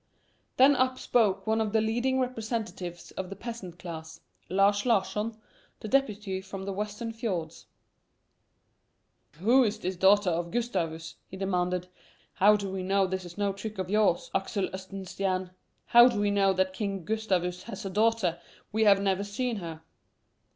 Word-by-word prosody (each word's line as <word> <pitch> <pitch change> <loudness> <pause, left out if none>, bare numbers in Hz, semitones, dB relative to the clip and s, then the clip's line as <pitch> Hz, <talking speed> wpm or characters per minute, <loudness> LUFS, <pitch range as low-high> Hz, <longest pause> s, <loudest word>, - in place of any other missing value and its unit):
Then 275 +2 +7
up 255 0 +1
spoke 200 -7 +1
one 220 0 +1
of 215 -1 -2
the 220 - +4
leading 240 +4 +1
representatives 225 -8 -4
of 190 -1 -5
the 195 - -6
peasant 215 -8 -7
class, 160 -2 -8 0.3
Lars 200 +2 +3
Larsson, 220 -1 0 0.4
the - - -6
deputy 210 -7 0
from 190 0 -7
the 195 - -3
western 210 +3 -4
fiords. 180 -8 -4 1.7
"Who 230 - +4
is 215 -2 0
this 185 -3 -3
daughter 190 +1 +4
of 170 +1 -2
Gustavus?" 170 -8 -3
he 190 - -9
demanded. 180 -2 -1 0.5
"How 205 +2 +5
do 200 -2 -3
we 190 -1 -3
know 195 +1 +2
this 190 0 -3
is 175 +1 -11
no 200 -1 0
trick 210 +2 -7
of 185 0 -3
yours, 210 -5 +2
Axel 195 0 -1
Oxenstiern? 190 -1 -3 0.3
How 240 +1 +8
do 235 -5 0
we 205 0 +2
know 200 -1 +3
that 190 0 0
King 195 -3 -3
Gustavus 185 -5 -1
has 225 -2 -6
a 195 - -3
daughter? 210 -4 +2 0.3
We 220 +1 +2
have 200 -2 +6
never 195 0 +1
seen 225 +3 -2
her." 165 -4 -7
200 Hz, 160 wpm, -28 LUFS, 185-220 Hz, 1.7 s, How